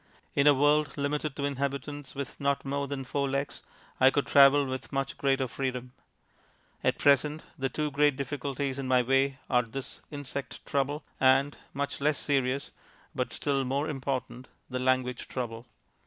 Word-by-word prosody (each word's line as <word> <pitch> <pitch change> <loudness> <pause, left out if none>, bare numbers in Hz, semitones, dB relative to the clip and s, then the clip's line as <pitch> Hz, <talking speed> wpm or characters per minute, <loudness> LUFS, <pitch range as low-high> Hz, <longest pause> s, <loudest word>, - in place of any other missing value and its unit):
In 140 0 +3
a 145 - +9
world 145 +2 +3
limited 145 0 -1
to 140 - -2
inhabitants 140 0 -3
with 140 -2 -5
not 140 0 0
more 140 +1 -1
than 140 -1 -4
four 140 +1 -1
legs 140 +1 -2 0.4
I 130 - +7
could 140 +1 0
travel 140 0 +6
with 130 0 -5
much 135 -1 -2
greater 135 -1 +1
freedom. 125 -1 -4 0.9
At - - +2
present 145 +2 +3
the 135 0 -1
two 150 +3 -2
great 145 0 +3
difficulties 140 0 -3
in 135 - -3
my 125 -1 +4
way 135 +2 +2
are 125 -2 +4
this 125 +3 -7
insect 140 -2 -6
trouble, 145 +2 -1 0.2
and 135 +2 +4 0.2
(much 140 0 -3
less 150 +1 +2
serious, 135 -1 0 0.4
but - - -2
still 140 -1 0
more 140 +4 -1
important) 130 -3 -3 0.2
the 130 - -1
language 130 -1 0
trouble. 120 -2 -5
140 Hz, 160 wpm, -29 LUFS, 130-145 Hz, 0.9 s, a